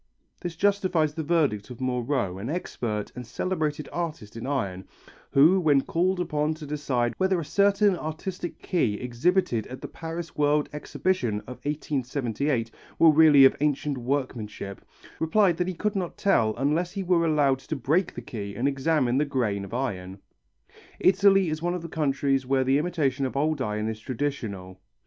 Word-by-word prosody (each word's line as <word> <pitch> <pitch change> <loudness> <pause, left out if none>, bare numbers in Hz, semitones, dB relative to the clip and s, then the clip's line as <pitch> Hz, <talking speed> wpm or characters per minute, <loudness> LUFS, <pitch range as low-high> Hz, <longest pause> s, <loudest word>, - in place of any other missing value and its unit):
] - - -42
This 175 -2 -4
justifies 185 -5 +1
the 160 - -3
verdict 145 -10 +1
of 125 - -9
Moreau, 125 -6 -1
an 110 +6 -5
expert 115 - -3
and 125 - -6
celebrated 155 +1 -2
artist 155 -12 -4
in 115 +2 -6
iron, 100 -10 -2 0.4
who 160 +8 +5
when 145 -5 +4
called 180 +5 0
upon 155 -2 0
to 155 -1 -9
decide 135 -5 -1
whether 190 -1 +2
a 165 - -4
certain 200 +2 +3
artistic 175 +3 -5
key 140 - +1
exhibited 125 - 0
at 130 - -8
the - - -7
Paris 165 0 -7
World 150 0 +2
Exhibition 150 - -1
of 125 - -9
1878 135 -4 -2 0.3
were 165 -1 +7
really 150 -3 +7
of 135 - +5
ancient 145 -2 0
workmanship, 120 -6 -4 0.4
replied 175 +1 +3
that 180 - 0
he 185 - -3
could 210 +5 -1
not 180 -3 -3
tell 115 - +2
unless 155 +7 0
he 195 -1 -3
were 175 -2 +2
allowed 145 -5 +2
to 135 +4 -5
break 155 +7 0
the 120 - -6
key 100 -4 -6
and 125 +4 0
examine 135 -2 +1
the - - +3
grain 120 -8 -1
of 100 - -9
iron. 95 -7 -3 0.8
Italy 195 0 +5
is 155 0 -3
one 175 +1 0
of 175 - -5
the - - -5
countries 140 -3 0
where 130 +1 +1
the 135 +2 +3
imitation 150 -5 0
of 130 +1 -2
old 150 0 +1
iron 105 -2 -2
is 110 -1 -4
traditional. 110 -8 -4
145 Hz, 170 wpm, -26 LUFS, 125-170 Hz, 0.8 s, were